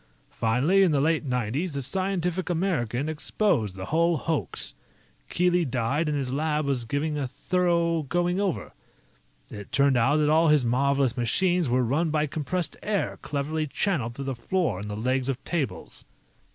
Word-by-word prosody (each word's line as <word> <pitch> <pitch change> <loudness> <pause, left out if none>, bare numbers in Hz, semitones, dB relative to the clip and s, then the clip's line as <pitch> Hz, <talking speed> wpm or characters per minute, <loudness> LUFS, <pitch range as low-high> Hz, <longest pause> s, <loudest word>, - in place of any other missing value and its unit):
Finally, 130 +13 +2
in 190 - +5
the 145 - +2
late 160 +2 +1
nineties, 125 - -1
The 140 -1 -2
Scientific 185 +3 -1
American 155 - -1
exposed 155 - 0
the 95 0 -6
whole 165 - +2
hoax. 160 -2 -1 0.6
Keely 180 0 +2
died, 135 +3 -1
and 150 - 0
his 130 -2 -2
lab 150 +1 0
was 135 -4 -1
given 145 +5 -1
a 135 - -2
thorough 170 +2 0
going 175 +5 0
over. 195 -4 -2 0.8
It 100 -2 -9
turned 140 -2 +3
out 135 +5 +3
that 150 -1 +2
all 160 +2 +4
his 150 -4 +4
marvelous 135 +1 +2
machines 175 - +1
were 125 +1 +2
run 150 +8 +1
by 155 0 +1
compressed 160 +4 -3
air 205 -2 -2
cleverly 155 +2 -2
channeled 135 - -1
through 140 - -5
the 135 - -2
floor 130 - -1
and 105 +1 -6
the 105 - -4
legs 130 +3 0
of 135 0 -3
tables." 135 - -4
150 Hz, 165 wpm, -26 LUFS, 125-170 Hz, 0.8 s, in